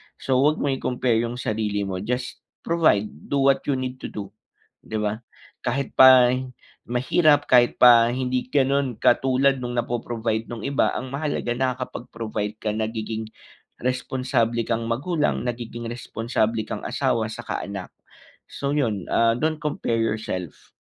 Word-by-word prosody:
So, 130 -1 0
wag 150 +3 +4
mong 135 -2 0
i-compare 125 -2 +1
yung 120 +1 -3
sarili 105 -3 -1
mo, 95 -2 -3
just 125 +5 -3 0.2
provide 160 -12 +3 0.2
do 140 -1 +2
what 135 - -1
you 140 - +2
need 130 0 -4
to - - -5
do, 100 -2 -7 0.5
di 110 - -4
ba? 105 +2 -2 0.4
Kahit 130 +2 -2
pa 130 -1 +8 0.6
mahirap 145 +4 +3
kahit 120 -1 +4
pa 120 -1 +7
hindi 125 0 -2
gano'n 135 -4 +1
katulad 135 0 +3
nung 120 0 -4
napo-provide 115 -2 -2
nung 120 - -5
iba 140 0 +1
ang 130 - -4
mahalaga 145 -4 -2
nakakapag-provide 115 -4 -3
ka 110 - -2
nagiging 110 0 -3 0.5
responsable 125 -2 0
kang 115 0 -1
magulang 150 +6 0
nagiging 120 -1 -5
responsable 115 -1 -1
kang - - -5
asawa - - 0
'tsaka - - -5
anak. 100 -2 -6 0.6
So, 140 0 -3
'yon, 110 -10 0
ah, 115 0 +4
don't 155 +4 0
compare 150 -6 -1
yourself. 105 -6 -4
120 Hz, 140 wpm, -24 LUFS, 110-130 Hz, 0.6 s, pa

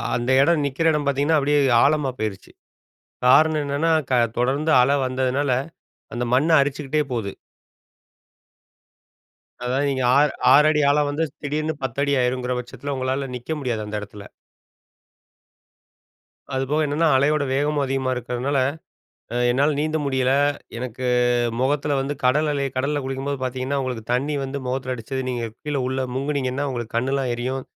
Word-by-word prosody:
அந்த 120 +2 -2
எடம் 155 0 +3
நிக்கிற 160 +4 +1
எடம் 150 -2 -1
பாத்தீங்கன்னா 145 +3 +2
அப்டியே 145 +1 +2 0.2
ஆழமா 145 -1 +2
போயிருச்சு. 105 -3 -4 0.8
காரணம் 155 +3 +5
என்னன்னா, 145 +4 0 0.2
க - - 0 0.3
தொடர்ந்து 140 +6 +1
அல 140 +3 +3
வந்ததுனால, 130 +1 0 0.6
அந்த 120 +1 -2
மண்ண 150 +6 +2
அரிச்சுக்கிட்டே 145 +1 0
போவுது. 105 -5 -3 2.3
அதாவது, 135 +3 0
நீங்க, 130 -2 -1
ஆ - - +6 0.4
6 150 +2 +6
அடி 150 -1 +1
ஆழம் 145 0 +2
வந்து 150 +3 -1 0.2
திடீர்ன்னு 155 +2 -2
10 130 +1 -3
அடி 140 0 +1
ஆயிரும்ங்கிற 125 0 -1
பட்சத்துல 135 +3 -6
உங்களால 130 +1 -2
நிக்க 125 +6 -8
முடியாது, 120 -5 -2
அந்த 105 0 -4
எடத்துல. 105 0 -10 2.3
அதுபோக, 140 +4 0
என்னன்னா 155 +3 +1
அலையோட 145 +2 +2
வேகமும் 145 +1 +1
அதிகமா 135 -1 -1
இருக்கிறதுனால, 125 +3 -2 0.8
அ 120 - -1
என்னால 145 +4 +2
நீந்த 155 +1 0
முடியல. 130 -1 +1 0.4
எனக்கு 125 +1 -5 0.6
மொகத்துல 140 +1 +1
வந்து 140 +2 -2
கடல் 150 +4 +3
அலை 140 -1 -1
கடல்ல 145 +2 0
குளிக்கும்போது 135 0 -3
பாத்தீங்கன்னா, 130 +2 -2
உங்களுக்கு 125 -4 -5
தண்ணி 145 +4 0
வந்து, 135 +1 -4
மொகத்துல 130 0 -2
அடிச்சது 130 +3 -5
நீங்க 120 -2 -3 0.2
கீழே 145 -2 -2
உள்ள 130 0 -2
முங்கினீங்கன்னா, 140 0 -1
உங்களுக்கு 120 -2 -5
கண்ணெல்லாம் 130 +1 0
எரியும். 130 +2 -3
135 Hz, 140 wpm, -22 LUFS, 125-145 Hz, 2.3 s, ஆ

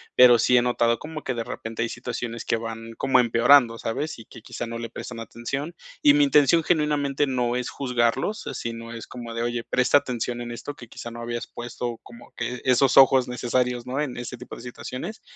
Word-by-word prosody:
pero 125 -2 +8
sí 125 +2 +4
he - - +5
notado 120 -1 +1
como 155 0 -7
que 130 - -2
de 115 -1 -3
repente 115 0 -6
hay 115 - 0
situaciones 120 -1 -5
que - - +1
van 115 0 -7
como 130 -1 +3
empeorando, 120 0 +5
¿sabes?, 145 +7 -3
y 115 - -11
que - - -13
quizá 120 - -6
no 115 0 -5
le 115 0 -5
prestan 115 0 -7
atención, 135 +8 -5 0.3
y 295 -1 +7
mi 295 0 +5
intención 165 - +4
genuinamente 150 -3 +1
no 125 -2 0
es 125 - -3
juzgarlos, 125 - -1
si 115 - -4
no 115 0 -8
es 115 - -7
como 120 -2 -8
de: 115 0 -2
"Oye, 120 0 -2
presta 125 +3 +4
atención 125 -3 -3
en 120 0 -6
esto, 120 +5 -6
que 120 - -12
quizá 120 - -8
no 120 0 -8
habías 120 0 -4
puesto 120 0 -4
como 120 0 -14
que 120 +1 -4
esos 130 +1 +4
ojos 130 -2 +7
necesarios", 125 0 -1
¿no?, 130 +3 -1
en 135 -5 -3
ese 125 +1 -5
tipo 125 - -9
de - - -10
situaciones, 130 - -7
120 Hz, 215 wpm, -25 LUFS, 115-135 Hz, 0.3 s, pero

